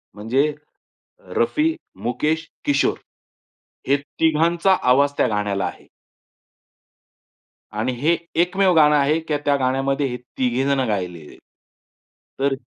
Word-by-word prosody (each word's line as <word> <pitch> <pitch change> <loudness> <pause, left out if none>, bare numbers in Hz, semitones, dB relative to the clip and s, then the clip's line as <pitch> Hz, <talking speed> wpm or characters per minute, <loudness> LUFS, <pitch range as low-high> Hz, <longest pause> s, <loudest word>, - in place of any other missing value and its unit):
म्हणजे 130 +8 0 0.8
रफी, 320 +1 +1 0.3
मुकेश, 155 +7 -1 0.2
किशोर. 140 -1 +2 0.9
हे 140 +2 +4
3घांचा 165 +5 +1
आवाज 140 +3 +4
त्या - - +3
गाण्याला 105 -2 -1
आहे. - - -7 1.9
आणि 110 +4 -1
हे 165 +5 +2 0.2
एकमेव 185 +1 +2
गाणं 150 -1 +6
आहे 150 +3 +2
की 160 -2 -2
त्या 145 - +3
गाण्यामध्ये 135 +2 0
हे 125 -1 -4 0.2
3घे 125 0 +1
जण 140 -1 +1
गायलेले 90 -7 -3
आहेत. - - -16 1.0
तर 140 0 +1
अ, - - -4
140 Hz, 120 wpm, -21 LUFS, 125-160 Hz, 1.9 s, गाणं